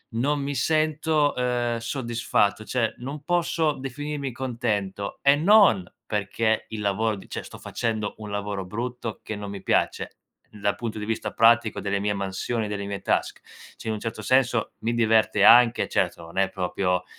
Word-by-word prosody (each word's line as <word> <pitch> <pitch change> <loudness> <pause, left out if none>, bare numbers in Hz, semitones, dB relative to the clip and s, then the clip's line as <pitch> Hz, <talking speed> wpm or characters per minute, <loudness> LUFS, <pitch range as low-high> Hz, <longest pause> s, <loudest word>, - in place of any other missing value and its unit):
non 140 +4 +1
mi 140 0 -3
sento, 155 -1 +1
ehm, 120 -1 0
soddisfatto, 115 -4 -1
cioè, 120 -3 0
non 140 +4 -7
posso 165 -2 +1
definirmi 140 0 -5
contento 110 -6 -3
e 140 0 +5
non 175 - +5 0.2
perché 105 +2 0
il 110 -1 -5
lavoro 105 +2 0
di 95 - -13
cioè - - -5
sto - - -11
facendo 110 -3 -3
un 105 -1 -8
lavoro 100 -1 -3
brutto, 115 +3 -5
che 110 - -5
non 105 -1 -6
mi 100 - -8
piace - - 0 0.3
dal 100 -1 -2
punto 115 -2 -5
di 105 - -4
vista 115 0 -2
pratico, 115 -2 +4
delle 100 +1 -1
mie 105 +1 0
mansioni, 100 +3 -2
delle 100 -1 -4
mie 100 0 -5
task. - - -1 0.3
Cioè, 110 - -6
in - - 0
un - - -6
certo 115 +1 -5
senso, 125 -3 +2
mi 115 +1 -1
diverte 110 -3 +3
anche. 120 0 +6
Certo, - - 0
non 85 +3 -12
è 95 0 +3
proprio 90 -1 -1
115 Hz, 170 wpm, -25 LUFS, 100-130 Hz, 0.3 s, anche